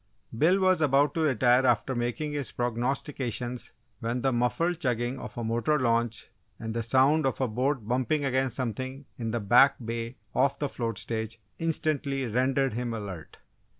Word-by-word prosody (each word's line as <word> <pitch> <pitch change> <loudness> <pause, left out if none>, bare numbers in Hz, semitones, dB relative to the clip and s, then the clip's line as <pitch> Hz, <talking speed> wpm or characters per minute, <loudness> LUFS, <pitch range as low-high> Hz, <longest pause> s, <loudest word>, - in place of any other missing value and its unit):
Bill 170 +11 +4
was 185 -3 +3
about 145 0 +3
to - - -2
retire 130 -4 +3
after 120 +1 +2
making 120 +5 -2
his 145 -4 -3
prognostications 125 0 -3 0.3
when 120 +2 -2
the 135 - +3
muffled 160 +8 0
chugging 125 -2 -1
of - - -9
a 120 - -2
motor 120 +7 +1
launch 115 -3 0 0.3
and 110 -1 -5
the 115 - -1
sound 135 +6 +3
of 135 - -2
a 130 - +1
boat 125 +1 -1
bumping 130 +4 0
against 130 -2 0
something 130 +3 -4
in 115 -1 -2
the 120 +1 -1
back 125 +7 +6
bay 115 +1 -4 0.2
off 140 +2 +2
the 145 - -2
float 115 -5 -3
stage, 110 +1 -4 0.2
instantly 150 -4 0
rendered 130 +3 +1
him 120 0 -3
alert. 95 -7 -7
125 Hz, 165 wpm, -28 LUFS, 115-140 Hz, 0.3 s, back